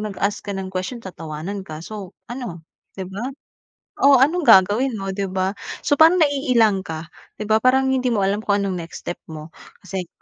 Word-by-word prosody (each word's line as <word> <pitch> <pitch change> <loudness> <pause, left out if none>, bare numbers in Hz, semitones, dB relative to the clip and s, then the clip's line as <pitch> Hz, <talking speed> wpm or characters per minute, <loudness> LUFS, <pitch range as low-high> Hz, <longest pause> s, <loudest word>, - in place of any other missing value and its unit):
nag-ask 205 -1 -2
ka 205 - -5
ng 190 -1 -5
question 185 +7 -3
tatawanan 165 +1 -6
ka 155 0 -7
so, 200 -3 -8 0.2
ano 235 -10 -6 0.3
'di 190 - -4
ba? 205 +5 -5 0.8
Oh, 280 0 +7
anong 325 +5 +3
gagawin 215 +6 +5
mo 195 0 -4
'di 195 0 -2
ba? 190 +1 0 0.3
So 290 - +2
parang 325 +3 +8
naiilang 250 -8 +3
ka. 160 +1 -6 0.3
'Di 215 - -4
ba, 220 0 +5
parang 265 +1 +4
hindi 255 -1 +1
mo 210 - +1
alam 200 +2 0
kung 205 -1 +1
anong 190 -2 -2
next 165 0 -9
step 175 - -4
mo 155 0 -8 0.3
kasi. 190 -2 -4
200 Hz, 190 wpm, -21 LUFS, 185-250 Hz, 0.8 s, parang